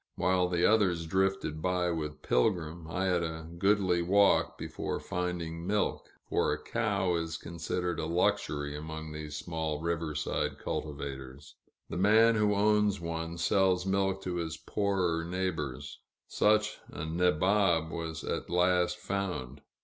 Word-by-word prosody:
While 90 -1 +2
the 90 0 +2
others 95 -7 +3
drifted 95 -3 0
by 90 0 +1
with 75 -2 -4
Pilgrim, 80 - 0
I 95 +3 -1
had 90 -2 +2
a 80 -1 -4
goodly 95 -3 +3
walk 100 +3 +3
before - - -4
finding 85 -1 -3
milk, 105 +1 0 0.2
for - - +1
a - - -1
cow 90 -1 0
is 80 -1 -3
considered 85 +1 -3
a 80 - -2
luxury 75 -4 0
among 80 +1 -6
these 75 -1 -6
small 80 -3 -3
riverside 80 -3 -2
cultivators; 70 -1 -6 0.3
the 80 - -5
man 110 +4 +5
who 105 -1 +2
owns 105 -1 +3
one 85 0 -4
sells 95 +1 +2
milk 95 0 0
to 90 -1 -2
his 80 -2 -3
poorer 90 -4 0
neighbors. 85 -7 -3 0.3
Such 105 0 +2
a 75 - -5
nabob 90 0 +2
was 80 -2 -4
at - - -3
last 90 0 +2
found. 90 -9 -3
85 Hz, 135 wpm, -30 LUFS, 80-95 Hz, 0.3 s, man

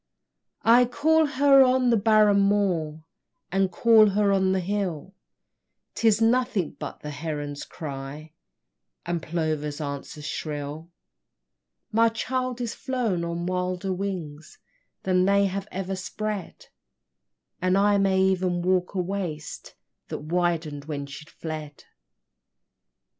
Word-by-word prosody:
Aye, 240 +2 +6
call 315 +5 +2
her 280 -1 +5
on 255 -1 +4
the - - +5
barren 215 -1 +4
moor, 180 -6 +1 0.5
And 195 0 +1
call 220 -2 +5
her 200 0 +2
on 190 -1 +2
the 190 - +1
hill: 185 -2 -3 0.8
'Tis 220 -2 +3
nothing 225 -6 +1
but - - -7
the 150 - -6
heron's 145 -1 -5
cry, 150 0 -8 0.7
And 170 -1 -2
plover's 155 -3 -2
answer 145 +1 -6
shrill; 150 +1 -5 1.0
My 230 +1 +4
child 255 +2 -3
is 235 -2 -2
flown 235 -10 -2
on 170 0 -3
wilder 185 +1 -2
wings 175 -6 -5 0.5
Than 185 -1 +2
they 200 +1 +4
have 195 +1 -3
ever 190 0 -3
spread, 205 +1 -5 0.9
And 185 +1 +2
I 205 0 +4
may 195 -1 +2
even 185 -2 +1
walk 185 +1 +1
a - - 0
waste 175 -5 -5 0.3
That - - -6
widen'd 165 -3 -1
when 145 -2 -4
she 140 +2 -10
fled. 155 -2 -8
185 Hz, 120 wpm, -25 LUFS, 155-210 Hz, 1.0 s, Aye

